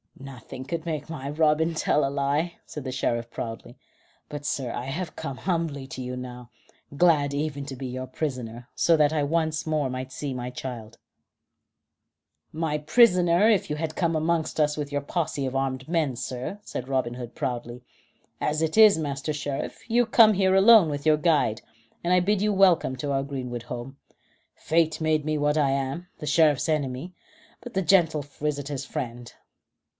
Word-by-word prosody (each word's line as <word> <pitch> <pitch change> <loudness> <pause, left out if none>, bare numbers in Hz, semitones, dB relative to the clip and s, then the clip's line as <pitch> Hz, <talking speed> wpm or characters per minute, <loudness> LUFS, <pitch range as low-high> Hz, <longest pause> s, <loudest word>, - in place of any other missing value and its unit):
"Nothing 130 -1 -9
could 165 +3 -4
make 160 -2 -4
my 140 -4 -5
boy 145 - -7
Robin 160 +1 +3
tell 150 -2 +1
a - - 0
lie," 145 +5 -1
said 150 - -7
the 130 - -4
Sheriff 120 -2 -1
proudly. 115 -1 -7 0.5
"But, 145 -1 -7
sir, 130 -4 -2
I 120 - -4
have 160 +5 -4
come 135 -2 -5
humbly 165 -6 -2
to 130 - -7
you 125 0 -4
now. 125 -1 -8 0.5
Glad 150 -4 +3
even 145 -1 -2
to 135 -1 -6
be 130 +1 -6
your 130 +1 -5
prisoner, 125 -4 -5
so 170 - +4
that 150 0 +3
I 155 - +1
might 145 - -2
once 160 -1 0
more 130 -4 -1
see 135 +1 -5
my 125 0 -4
child." 115 -3 -7 1.5
"My 155 -1 -1
prisoner 180 +1 +4
if 205 -6 +2
you 150 - -1
had 155 0 -3
come 165 -2 0
amongst 160 0 0
us 150 0 +2
with 145 -1 -4
your 145 0 -1
posse 150 -2 -2
of 130 0 -3
armed 135 -1 -2
men, 160 -6 0
sir," 125 - -5
said 130 - -6
Robin 130 -3 -1
Hood 120 -2 -7
proudly. 125 -3 -4 0.6
"As 155 +1 0
it 160 +5 -1
is, 215 -4 +8
Master 145 0 -3
Sheriff, 145 -2 -5
you 240 +1 +3
come 220 -1 +6
here 190 -1 +2
alone 200 -3 +7
with 145 -1 -4
your 155 -1 +5
guide, 150 -9 +2 0.4
and 175 +1 +2
I 180 - +6
bid 195 +2 +1
you 210 0 +2
welcome 185 -8 +4
to 140 +2 -3
our 135 0 0
greenwood 125 -4 -5
home. 125 +3 -7 0.6
Fate 160 -1 +1
made 155 -1 +1
me 155 0 0
what 150 +1 +1
I 140 -3 +3
am, 140 +6 -2
the 150 - -6
Sheriff's 150 -1 +3
enemy, 145 +2 -2 0.5
but 245 - -9
the 190 - +1
gentle 165 -4 +3
visitor's 145 -1 -4
friend. 120 -2 -5
145 Hz, 180 wpm, -26 LUFS, 130-165 Hz, 1.5 s, is